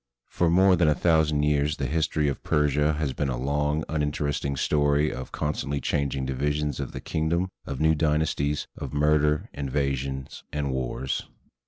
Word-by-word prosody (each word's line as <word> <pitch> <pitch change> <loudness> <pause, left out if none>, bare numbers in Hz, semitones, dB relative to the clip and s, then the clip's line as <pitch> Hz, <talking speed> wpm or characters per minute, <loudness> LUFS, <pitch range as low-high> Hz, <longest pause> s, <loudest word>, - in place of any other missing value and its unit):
For 85 - +1
more 95 +2 +5
than 85 -2 +3
a 75 - +4
thousand 80 -4 +2
years 75 0 +1
the - - -2
history 80 -1 0
of 70 - -2
Persia 75 +1 +2
has 75 -3 -2
been 70 +2 -1
a 65 - -2
long, 75 +4 0
unin 75 -2 -1
teresting 70 -1 -2
story 75 +1 +2
of 65 - -7
constantly 70 -1 -2
changing 70 -2 -1
divisions 75 +3 -1
of 70 - -4
the - - -7
king 80 0 -1
dom, 90 +3 0 0.2
of 70 -2 -4
new 80 0 +4
dynasties, 75 -2 0
of - - -6
murders, 75 0 +2
invasions, 70 -1 -3
and 75 -1 -2
wars. 65 0 -3
75 Hz, 170 wpm, -26 LUFS, 70-75 Hz, 0.2 s, more